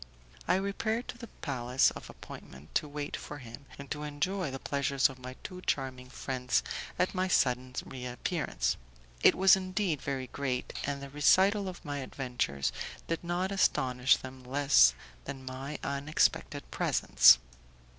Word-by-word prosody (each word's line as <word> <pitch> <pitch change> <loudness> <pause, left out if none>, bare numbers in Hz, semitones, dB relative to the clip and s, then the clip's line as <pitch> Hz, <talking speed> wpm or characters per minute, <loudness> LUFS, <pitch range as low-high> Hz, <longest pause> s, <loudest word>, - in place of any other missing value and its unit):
I - - +4
repaired 220 +5 -1
to - - -6
the 235 - -8
place 130 - +1
of - - -10
appointment 65 +3 -12
to 150 - +1
wait 145 0 -4
for 145 - -7
him, 130 +1 -11
and 140 -1 -10
to 150 - -3
enjoy 150 +4 -2
the 135 - -5
pleasure 140 0 -2
of 135 -1 +3
my 130 0 -8
two 180 0 -7
charming 130 -5 -2
friends 130 -1 -1 0.3
at 180 - +1
my 185 0 0
sudden 125 -6 +1
reappearance. 125 - -2 0.4
It - - +6
was 190 +1 +7
indeed 185 -4 -1
very 135 -2 -3
great, 130 -1 -3
and 140 -1 -3
the 140 - -7
recital 190 +8 +4
of 185 -2 -8
my 145 -1 -3
adventures 125 - -2 0.4
did 165 +1 -2
not 175 +2 -1
astonish 130 -9 +3
them 130 0 -10
less 125 - +5 0.3
than 135 -1 -7
my 135 +3 -5
unexpected 140 +2 0
presence. - - +6
140 Hz, 150 wpm, -31 LUFS, 130-175 Hz, 0.4 s, was